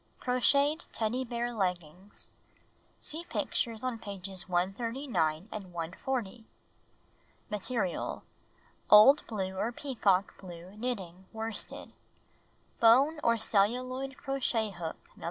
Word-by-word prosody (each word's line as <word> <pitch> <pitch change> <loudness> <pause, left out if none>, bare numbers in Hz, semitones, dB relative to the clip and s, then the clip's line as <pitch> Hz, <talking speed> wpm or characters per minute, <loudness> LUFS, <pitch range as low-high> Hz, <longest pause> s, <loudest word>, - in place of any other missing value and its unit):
Crocheted 280 +5 +2
Teddy 230 +4 -1
Bear 240 0 -3
Leggings 180 -2 -4 0.7
(See 320 +3 -5
pictures 230 -8 -2
on 250 -3 -2
pages 195 -3 -5
139 190 - 0
and 195 -4 -7
140.) 190 +7 -3 1.1
Material: 210 -2 -2 0.7
Old 215 +8 +9
l)luc 190 -4 -3
or 220 +5 -1
peacock 215 -8 +1
blue 180 +1 -10
knitting 190 -6 -5
worsted. 225 0 -5 0.9
Bone 270 +7 +6
or 230 0 +4
celluloid 255 +6 0
crochet 255 -6 -1
hook 170 -3 -5 0.2
No. - - -18
220 Hz, 100 wpm, -31 LUFS, 190-255 Hz, 1.1 s, Old